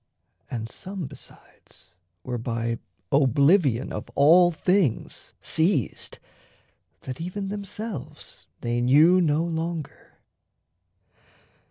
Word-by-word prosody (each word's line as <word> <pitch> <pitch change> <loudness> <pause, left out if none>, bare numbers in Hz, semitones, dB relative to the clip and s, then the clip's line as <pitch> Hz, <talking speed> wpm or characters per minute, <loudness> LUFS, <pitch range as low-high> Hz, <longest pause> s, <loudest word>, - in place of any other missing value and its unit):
And 115 -2 -4
some, 190 +7 -7
besides, - - -15 0.3
were 125 -1 -4
by 115 0 -2 0.3
oblivion 140 - +3
Of - - -5
all 170 +5 +6
things 175 - -1
seized, 160 - 0 0.8
that 130 +3 -7
even 195 +3 -4
themselves 200 - -7
they 120 0 -1
knew 155 +9 +5
No 155 -1 +2
longer. 165 -2 -5
155 Hz, 85 wpm, -25 LUFS, 125-180 Hz, 0.8 s, all